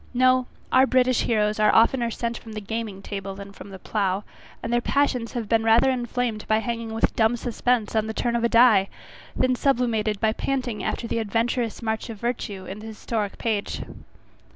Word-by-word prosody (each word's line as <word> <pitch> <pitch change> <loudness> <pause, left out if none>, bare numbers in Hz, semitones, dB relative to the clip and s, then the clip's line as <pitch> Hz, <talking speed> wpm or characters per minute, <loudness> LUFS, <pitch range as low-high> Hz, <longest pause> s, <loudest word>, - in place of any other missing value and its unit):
No, 255 0 +4 0.2
our 260 +1 +5
British 255 -1 +3
heroes 215 -2 +1
are 215 - +4
oftener 235 +1 +4
sent 235 +1 -3
from 225 - -11
the 215 - -4
gaming 210 -2 -5
table 195 -1 -5
than 200 0 -9
from 200 - -12
the 190 - -8
plough; 195 0 -1 0.4
and 230 - -2
their 240 - +3
passions 255 -4 0
have 235 -3 -3
been 225 0 +2
rather 230 +4 +5
inflamed 240 -3 -2
by 215 - +3
hanging 230 0 -3
with 225 - +1
dumb 225 +1 +3
suspense 240 -2 0
on 220 0 +1
the 220 - -3
turn 235 -1 0
of 235 - 0
a 235 - +3
die, 230 -5 +5 0.5
than 255 0 +2
sublimated 235 -6 +1
by 220 0 +2
panting 255 -3 -2
after 235 - -2
the 230 - -1
adventurous 230 +2 -1
march 220 +1 -2
of 225 - -6
virtue 210 -5 -3
in 195 +3 -7
the 220 - -9
historic 215 -1 -3
page. 215 -3 -2
225 Hz, 195 wpm, -24 LUFS, 215-245 Hz, 0.5 s, our